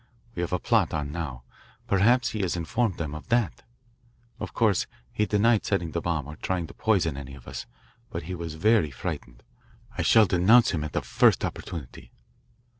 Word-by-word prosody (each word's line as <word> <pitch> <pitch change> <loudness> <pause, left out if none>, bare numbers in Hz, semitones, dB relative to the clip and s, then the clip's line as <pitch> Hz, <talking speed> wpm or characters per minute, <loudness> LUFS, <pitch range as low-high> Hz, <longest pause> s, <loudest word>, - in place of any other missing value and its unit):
We 100 - -4
have 85 - -2
a 90 - +2
plot 105 -4 +1
on 75 -2 -3
now 75 -7 -5 0.4
perhaps 120 +6 +3
he 110 - -4
has 90 -2 0
informed 95 +5 -1
them 75 -3 -4
of 75 - -8
that. 120 -3 +1 0.8
Of - - -5
course 105 -5 +2 0.3
he 105 - +1
denied 110 +1 +3
setting 90 -5 -1
the 85 - -2
bomb 80 -5 -1
or 75 +2 -9
trying 90 -3 -2
to - - -11
poison 90 -9 +1
any 70 0 -8
of 65 - -15
us, - - -6 0.4
but 85 - -5
he 90 +4 -5
was 85 -3 -5
very 105 -1 +3
frightened. 60 -2 -6 0.5
I - - -1
shall 110 -1 +6
denounce 95 +7 +5
him 80 -4 -2
at 75 - -5
the - - -1
first - - +3
opportunity." 75 -9 -7
85 Hz, 190 wpm, -26 LUFS, 75-105 Hz, 0.8 s, shall